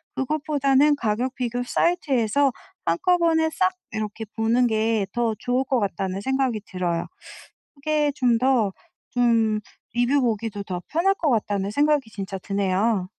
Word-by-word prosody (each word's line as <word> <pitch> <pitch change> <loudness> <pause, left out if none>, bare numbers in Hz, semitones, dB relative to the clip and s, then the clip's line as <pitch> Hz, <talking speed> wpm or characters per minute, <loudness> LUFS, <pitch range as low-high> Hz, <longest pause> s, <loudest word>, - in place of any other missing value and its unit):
그것보다는 285 0 +2
가격 235 +2 -1
비교 245 -1 -2
사이트에서 275 -3 +1 0.3
한꺼번에 325 - +2
싹 370 +2 +2 0.2
이렇게 215 0 -4
보는 235 +2 +2
게 220 -2 +1
더 235 -2 +1
좋을 250 +2 0
것 260 -1 +1
같다는 195 -1 -2
생각이 265 -2 0
들어요. 175 -3 -2 0.7
그게 295 +1 0
좀 245 -4 +3
더 245 -5 +2 0.4
좀 230 -3 +2 0.3
리뷰 245 +5 +2
보기도 220 -4 -2
더 180 -3 -5
편할 355 +5 +2
것 325 -6 0
같다는 205 -4 0
생각이 290 0 +2
진짜 195 -2 -5
드네요. 195 +1 0
240 Hz, 285 characters per minute, -24 LUFS, 210-280 Hz, 0.7 s, 좀